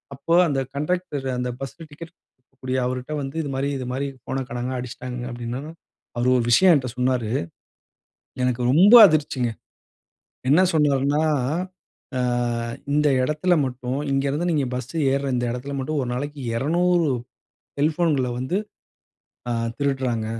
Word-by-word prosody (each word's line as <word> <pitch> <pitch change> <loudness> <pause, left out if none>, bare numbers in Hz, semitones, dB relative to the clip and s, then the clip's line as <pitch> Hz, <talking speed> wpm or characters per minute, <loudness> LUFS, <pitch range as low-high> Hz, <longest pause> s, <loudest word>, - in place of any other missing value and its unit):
அப்போ 140 +5 -2
அந்த 140 -3 0 0.2
கண்டக்டரு, 150 -3 -2
அந்த 125 0 -2
பஸ் 135 -1 -7
டிக்கெட் 165 +1 -10 0.2
குடுக்கக்கூடிய 130 0 -6
அவருட்ட 125 +3 -4
வந்து, 135 +1 -6
"இது 145 - -4
மாரி 135 +1 -1
இது 130 - -5
மாரி 140 +2 -2 0.2
போன 135 0 -2
காணாங்க, 120 +1 -3
அடிச்சுட்டாங்க." 125 0 -6
அப்டின்னதும். 125 +7 -6 0.4
அவரு 120 +1 +1
ஒரு 120 - +1
விஷயம் 180 +8 +6
என்ட்ட 130 -3 0
சொன்னாரு. 125 -3 0 1.1
எனக்கு 125 -1 0
ரொம்ப 190 - +7
அதிர்ச்சிங்க. 145 -6 0 1.0
என்ன 160 +6 +6
சொன்னாருன்னா, 145 -1 +2 1.0
"ஆ - - 0 0.7
இந்த 150 0 +3 0.2
எடத்துல 155 +6 +1
மட்டும், 125 +1 -3
இங்கே 135 +1 +1
இருந்து 165 +6 -1
நீங்க 145 -4 +1
பஸ் 125 +1 -5 0.2
ஏருற 140 0 0
இந்த 120 0 0
எடத்துல 130 +4 -5
மட்டும், 145 +3 -2
ஒரு 125 - -4
நாளைக்கு 145 +3 -5 0.2
200 170 +4 +2 0.7
செல்போன்கள 150 -3 +1
வந்து 130 +9 -1 0.9
ஆ - - +1 0.3
திருடுறாங்க." 130 -5 -1
135 Hz, 135 wpm, -23 LUFS, 125-150 Hz, 1.1 s, ரொம்ப